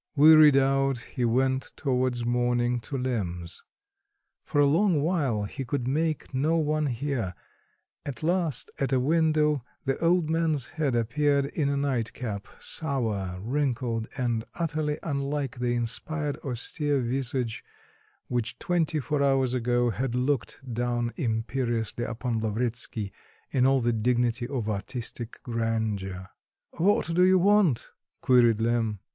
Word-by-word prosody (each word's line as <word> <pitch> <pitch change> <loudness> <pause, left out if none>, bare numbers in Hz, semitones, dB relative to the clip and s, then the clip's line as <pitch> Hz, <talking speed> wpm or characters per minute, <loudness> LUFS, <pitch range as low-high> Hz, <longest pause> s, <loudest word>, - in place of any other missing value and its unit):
Wearied 155 -1 +8
out 135 0 +2
he 120 +1 -5
went 130 +3 +1
towards 125 -3 0
morning 120 0 +1
to 135 +4 -5
Lemm's. 95 -10 -3 0.8
For 145 - -1
a 145 - +6
long 160 +1 +3
while 145 - 0
he 135 +7 -5
could 125 0 -2
make 155 +2 -1
no 150 +6 +2
one 155 -1 +1
hear; 120 - -2 0.7
at 135 -3 -6
last 170 -5 0
at 135 - 0
a 130 - +3
window 150 -1 +2 0.2
the 135 0 0
old 170 -1 +3
man's 160 -4 0
head 145 -6 -1
appeared 140 +5 +2
in 140 0 -1
a 140 - 0
nightcap, 120 -6 -2
sour, 110 - -2
wrinkled, 120 -2 -1
and 120 -3 0
utterly 155 -3 -1
unlike 140 -3 -2
the 120 0 0
inspired 145 +5 -2
austere 145 +3 -1
visage 125 -1 -2 0.6
which 120 -1 -2
twenty 165 -3 0
four 145 +2 -1
hours 135 -2 +2
ago 120 -1 +1
had 125 +3 -2
looked 130 0 -1
down 120 0 -1
imperiously 120 - -1
upon 115 0 -2
Lavretsky 110 -1 -2 0.4
in 130 -1 +3
all 135 -1 +3
the 120 0 +1
dignity 120 +1 +1
of 125 -5 -3
artistic 115 +2 -4
grandeur. 110 -5 -2 0.5
"What 175 -1 +1
do 180 - +3
you 185 +1 +6
want?" 190 - +3 0.3
queried 120 -3 +4
Lemm. 115 -2 +1
130 Hz, 130 wpm, -27 LUFS, 115-145 Hz, 0.8 s, Wearied